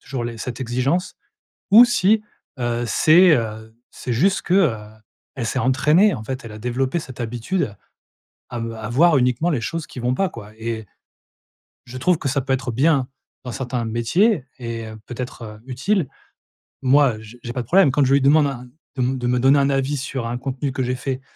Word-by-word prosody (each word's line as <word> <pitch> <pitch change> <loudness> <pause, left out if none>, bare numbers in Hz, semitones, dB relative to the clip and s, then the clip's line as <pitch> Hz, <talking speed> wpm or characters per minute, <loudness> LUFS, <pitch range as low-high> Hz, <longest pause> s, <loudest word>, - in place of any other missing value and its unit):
toujours 130 -3 -5
les 115 -1 -5
cette 120 +1 -6
exigence» 130 +9 -1 0.6
ou 230 +4 +10
si, 220 -2 +2 0.4
heu, 120 0 -1
c'est, 175 +7 +5
heu, 110 -1 -4 0.2
c'est 125 - -6
juste 185 - +2
que, 175 - -1
heu, 165 - +3 0.6
elle 125 -4 -3
s'est 130 +3 -1
entraînée, 150 +10 +3
en 110 - -6
fait, 130 +3 -5
elle 115 - -8
a 105 - -9
développé 130 +7 -1
cette 130 -5 -8
habitude 120 - -2 0.7
à 120 - -5
me 115 0 -4
à 110 -1 -6
voir 155 +6 +4
uniquement 125 +6 +1
les 145 -8 0
choses 165 +4 -4
qui - - -9
vont 125 +1 0
pas, 195 -1 0
quoi, 105 -5 -11
et 110 -1 -4 1.0
je 125 +1 -8
trouve 170 +5 +2
que 140 - -3
ça 140 +1 0
peut 135 +1 -2
être 130 -2 -1
bien 135 +1 +2 0.4
dans 125 - -5
certains 125 -2 -3
métiers 125 - +1
et, 115 -2 -5
heu, 110 0 -9
peut-être, 125 0 -7
heu, 105 -1 -9
utile. 140 +6 -1 0.7
Moi 135 -3 +4
j 110 +2 -13
j'ai 120 - -5
pas 125 - -2
de 120 - -8
problème 185 -3 +5
quand 145 +2 +2
je 135 - +2
lui 140 - +4
demande 145 +2 +4
un 125 -2 -6 0.3
de 130 - -2
me 130 +2 +1
de 125 -1 -2
me 125 0 +1
donner 135 +3 +5
un 140 - +2
avis 135 +1 0
sur 130 -3 -4
un 120 +1 -3
contenu 135 +1 -3
que 130 - -1
j'ai 125 +1 -1
fait 130 0 -4
130 Hz, 210 wpm, -21 LUFS, 120-145 Hz, 1.0 s, ou